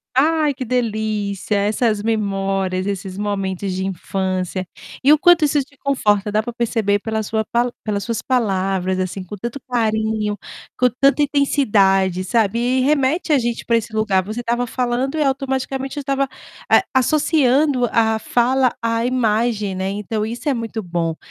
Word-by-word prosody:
Ai, 305 +2 +3
que 265 0 -5
delícia, 215 -4 -1
essas 210 +1 +1
memórias, 195 -4 -1
esses 195 -1 -4
momentos 195 -2 -2
de 190 - -2
infância, 185 0 -2 0.4
e 280 - +6
o 305 - +7
quanto 350 0 +5
isso 295 0 +3
te 280 +1 -24
conforta, 210 -7 +1
dá 215 +1 +1
para 240 - -6
perceber 225 -3 0
pela 220 0 -2
sua 220 +1 -1
pala 240 +1 +1
pelas 205 -2 -2
suas 230 +1 -3
palavras 190 -6 0
assim, 185 +1 -3
com 195 +3 -8
tanto 235 +7 -5
carinho, 220 -3 0 0.4
com 250 - +4
tanta 280 +2 +4
intensidade, 200 - +2
sabe. 220 +2 +1
E 255 +2 +1
remete 295 +4 +1
a 285 - +4
gente 235 -1 -3
para 235 - +2
esse 230 0 -4
lugar, 215 -3 +1
você 215 +5 -5
estava 240 +1 -1
falando 255 +4 -1
e 300 - +2
automaticamente 270 0 -2
eu - - -1
estava, 275 0 0 0.4
eh, - - +6
associando 275 -2 +2
a 220 -1 +2
fala 250 +2 +2
à 230 0 0
imagem, 225 -4 0
né, 190 +1 -2
então, 210 +2 -3
isso 235 +7 -5
é 285 - +3
muito 225 -2 -4
bom, 170 -2 -2
225 Hz, 165 wpm, -20 LUFS, 200-260 Hz, 0.4 s, o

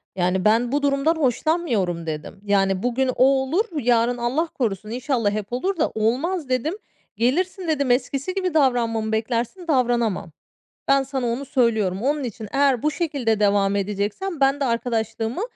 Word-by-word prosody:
Yani, 180 0 0
"Ben 230 +3 +3
bu 290 +1 +1
durumdan 280 +3 +2
hoşlanmıyorum," 245 - 0
dedim. 155 +5 -6
Yani, 195 -2 +1
"Bugün 250 +2 +1
o 255 - +4
olur, 275 +9 +2
yarın 240 -1 +2
Allah 255 +8 0
korusun 215 - -3
inşallah 240 -2 0
hep 210 +1 -4
olur 370 +10 -1
da, 315 - +1
olmaz," 260 - -1
dedim. 255 +7 0 0.4
"Gelirsin," 355 - 0
dedim 280 -5 +1
"Eskisi 275 +6 0
gibi 370 -3 -1
davranmamı 235 -7 +1
beklersin, 235 - -2
davranamam. 240 - +1 0.6
Ben 275 0 +4
sana 265 -2 -3
onu 240 +4 -2
söylüyorum. 220 -8 +1
Onun 285 +3 0
için 220 -2 -6
eğer 275 -3 +2
bu 305 - +2
şekilde 280 - -1
devam 200 -1 +2
edeceksen 205 - -2
ben 275 +1 +3
de 275 - 0
arkadaşlığımı 230 - -2
245 Hz, 155 wpm, -23 LUFS, 220-285 Hz, 0.6 s, o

